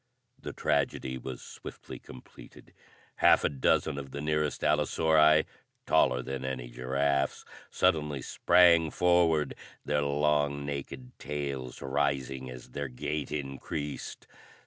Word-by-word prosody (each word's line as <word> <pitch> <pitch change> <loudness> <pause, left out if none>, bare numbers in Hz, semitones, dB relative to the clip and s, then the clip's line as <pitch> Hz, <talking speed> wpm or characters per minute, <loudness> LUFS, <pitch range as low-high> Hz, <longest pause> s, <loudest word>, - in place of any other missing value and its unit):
The - - -6
tragedy 65 -2 -1
was 65 0 -7
swiftly - - -10
completed. 65 -1 -14 0.4
Half - - +5
a - - +2
dozen 70 0 +1
of 70 -1 -8
the 70 - -6
nearest 75 0 -1
allosauri, 75 +1 +4 0.4
taller 65 0 +3
than 65 0 -5
any 65 -2 -4
giraffes, 70 +3 -1 0.2
suddenly 75 -3 +1
sprang 85 -3 +4
forward, 85 -4 +2 0.3
their 75 0 +1
long, 70 0 +1
naked 75 - -6
tails 70 -3 -5
rising 70 -1 -1
as 60 -1 -10
their 70 0 -4
gait 70 +3 -4
increased. 70 +1 -5
70 Hz, 115 wpm, -29 LUFS, 65-75 Hz, 0.4 s, Half